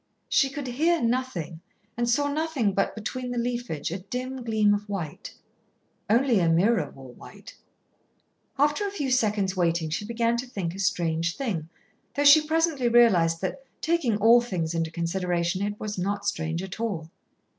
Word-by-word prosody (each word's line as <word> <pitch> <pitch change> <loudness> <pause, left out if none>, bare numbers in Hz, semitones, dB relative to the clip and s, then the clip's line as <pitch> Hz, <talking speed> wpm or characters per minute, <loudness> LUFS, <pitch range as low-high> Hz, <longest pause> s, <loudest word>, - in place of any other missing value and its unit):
She 275 - +3
could 280 0 -6
hear 320 +7 +1
nothing 230 -10 -2 0.3
and 240 0 -1
saw 285 +4 +2
nothing 285 -8 0
but, 195 - 0
between 250 +4 -5
the 245 - -4
leafage, 240 -11 -3
a 180 - -3
dim 250 +6 -5
gleam 215 -3 +3
of 205 0 -3
white. 175 -7 -5 0.7
Only 240 +1 +3
Ameerah 170 0 +2
wore 130 -2 -12
white. - - -13 1.0
After 295 +8 +2
a - - -4
few 290 -10 -3
seconds' 210 -6 +1
waiting 170 -3 0
she 170 - -2
began 235 +1 0
to 250 +2 -4
think 185 -8 -4
a 195 - -9
strange 170 -3 0
thing, 185 - -3 0.5
though 285 - +1
she 290 +2 +9
presently 320 -5 +1
realised 180 -9 +4
that, 195 +8 -4 0.2
taking 310 -10 +1
all 230 +3 +6
things 175 -8 -3
into 165 -1 -1
consideration, 175 +1 -1
it 205 +1 -3
was 210 -3 -4
not 200 +2 -2
strange 165 -3 -2
at 190 +2 -7
all. 175 -9 -3
210 Hz, 165 wpm, -26 LUFS, 175-250 Hz, 1.0 s, she